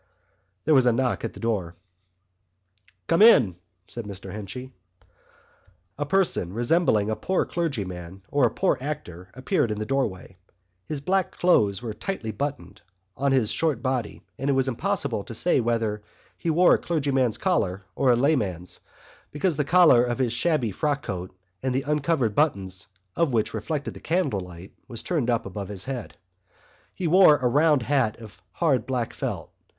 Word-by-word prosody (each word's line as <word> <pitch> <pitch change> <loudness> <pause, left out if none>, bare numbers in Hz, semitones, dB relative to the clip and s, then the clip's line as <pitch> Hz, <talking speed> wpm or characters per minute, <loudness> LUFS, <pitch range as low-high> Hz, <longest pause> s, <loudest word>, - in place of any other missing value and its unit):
There 155 - +4
was 130 -3 +5
a - - +6
knock 125 +2 0
at 115 - -3
the - - -12
door. 100 -7 -2 1.3
"Come 165 - +2
in!" 130 - +7 0.3
said 120 -2 -6
Mr 95 -2 -8
Henchy. 125 +6 -7 1.2
A 145 -1 -3
person 175 - +1
resembling 120 - +2
a - - 0
poor 185 +9 0
clergyman 95 - -4
or 140 -3 +3
a - - +3
poor - - 0
actor 100 - -6
appeared 130 -2 0
in 105 - -2
the 110 - -3
doorway. 105 -8 -2 0.5
His 150 -3 -3
black 185 +4 0
clothes 105 - +3
were 115 -3 -4
tightly 115 - -4
buttoned 110 -6 -5 0.3
on 140 +1 0
his 130 -6 +2
short 150 -7 0
body 130 -4 -2 0.2
and 135 +2 -1
it - - +4
was 135 0 +1
impossible 140 - -1
to 115 - -7
say 175 +4 +2
whether 115 -3 -1 0.3
he 170 - -3
wore 175 +3 +5
a - - +3
clergyman's 135 -8 0
collar 100 - 0
or 135 - +2
a 120 - +6
layman's, 110 - 0 0.5
because 150 +3 0
the 150 - 0
collar 160 -6 +6
of 120 -1 -1
his 125 -3 0
shabby 140 -5 +1
frock 145 +8 -1
coat, 90 -1 -5 0.3
the 130 0 -1
uncovered 150 -5 0
buttons 95 - 0 0.3
of 165 -6 +1
which 110 -2 0
reflected 140 +7 -3
the - - -11
candlelight, 95 - -3
was 115 - -7
turned 150 -9 -1
up 115 -2 +1
about 100 +1 -6
his 100 0 -6
neck. 130 -4 -5 0.8
He 185 - -5
wore 170 -2 +6
a 130 -1 0
round 145 +1 +3
hat 125 -5 +1
of 110 -3 -13
hard 140 -9 +1
black 125 -3 -2
felt. - - -4
125 Hz, 165 wpm, -25 LUFS, 105-150 Hz, 1.3 s, in